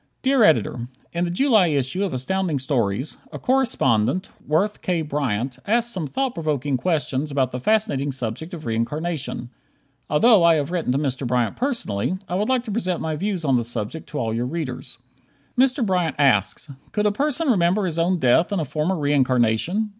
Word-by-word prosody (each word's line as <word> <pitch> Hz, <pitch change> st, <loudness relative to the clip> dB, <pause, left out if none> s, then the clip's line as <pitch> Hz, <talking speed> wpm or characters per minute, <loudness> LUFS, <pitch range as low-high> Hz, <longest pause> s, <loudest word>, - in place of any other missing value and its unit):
Dear 265 Hz, -2 st, +4 dB
Editor: 120 Hz, -, +2 dB, 0.3 s
In 170 Hz, +1 st, 0 dB
the -, -, -2 dB
July 215 Hz, 0 st, +4 dB
issue 145 Hz, +5 st, 0 dB
of 195 Hz, -, -1 dB
Astounding 165 Hz, +5 st, -1 dB
Stories, 130 Hz, -2 st, -1 dB
a -, -, -6 dB
correspondent, 185 Hz, -, +1 dB, 0.2 s
Worth 195 Hz, +8 st, +1 dB
K. 175 Hz, -3 st, 0 dB
Bryant, 130 Hz, -4 st, -2 dB
asks 235 Hz, +2 st, +1 dB
some 170 Hz, -5 st, -3 dB
thought 265 Hz, -, -1 dB
provoking 150 Hz, -4 st, -1 dB
questions 150 Hz, -1 st, -1 dB
about 135 Hz, -3 st, 0 dB
the 125 Hz, -, -4 dB
fascinating 205 Hz, -, +1 dB
subject 135 Hz, -, -4 dB
of 155 Hz, -, -10 dB
reincarnation. 125 Hz, +2 st, -3 dB, 0.6 s
Although 195 Hz, +6 st, +5 dB
I 170 Hz, -1 st, +6 dB
have 150 Hz, +1 st, -1 dB
written 170 Hz, -7 st, -1 dB
to -, -, +1 dB
Mr. 135 Hz, -3 st, -2 dB
Bryant 120 Hz, -2 st, 0 dB
personally, 185 Hz, -, -2 dB
I -, -, -5 dB
would 205 Hz, +5 st, 0 dB
like 255 Hz, -2 st, +2 dB
to 225 Hz, -, -6 dB
present 185 Hz, -5 st, -1 dB
my 160 Hz, -1 st, -2 dB
views 185 Hz, 0 st, -2 dB
on 135 Hz, -3 st, +3 dB
the 120 Hz, -, 0 dB
subject 120 Hz, +6 st, -5 dB
to 150 Hz, -, -5 dB
all 115 Hz, -3 st, -1 dB
your 120 Hz, +2 st, -1 dB
readers. 130 Hz, -5 st, -5 dB, 0.6 s
Mr. 255 Hz, -1 st, +3 dB
Bryant 180 Hz, -5 st, 0 dB
asks: 120 Hz, -5 st, +2 dB, 0.3 s
"Could 210 Hz, 0 st, 0 dB
a 210 Hz, -, +4 dB
person 295 Hz, +7 st, 0 dB
remember 190 Hz, -2 st, +2 dB
his 170 Hz, -2 st, -2 dB
own 180 Hz, +2 st, +2 dB
death 160 Hz, +6 st, +3 dB
in 200 Hz, -, 0 dB
a 160 Hz, -, -1 dB
former 155 Hz, +6 st, -1 dB
reincarnation?" 145 Hz, -, +1 dB
155 Hz, 185 wpm, -23 LUFS, 130-195 Hz, 0.6 s, I